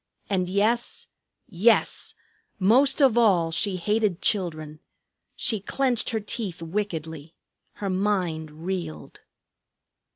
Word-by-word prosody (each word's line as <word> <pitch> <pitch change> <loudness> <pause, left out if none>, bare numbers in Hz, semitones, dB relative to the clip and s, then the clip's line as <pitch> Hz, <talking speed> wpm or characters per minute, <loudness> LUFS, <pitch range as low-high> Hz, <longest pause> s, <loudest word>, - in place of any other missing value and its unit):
And 185 -2 0
yes, 215 +5 0 0.4
yes! 215 +5 +1 0.4
Most 260 +9 +4
of 240 -3 +5
all 180 -8 +3
she 185 +4 +1
hated 210 0 0
children. 155 -8 -1 0.6
She 220 - 0
clenched 250 +4 0
her 225 - -1
teeth 205 -3 -3
wickedly; 160 -4 -5 0.4
her 200 - -4
mind 185 -5 -1 0.2
reeled. 180 -4 -5
195 Hz, 100 wpm, -25 LUFS, 165-220 Hz, 0.6 s, of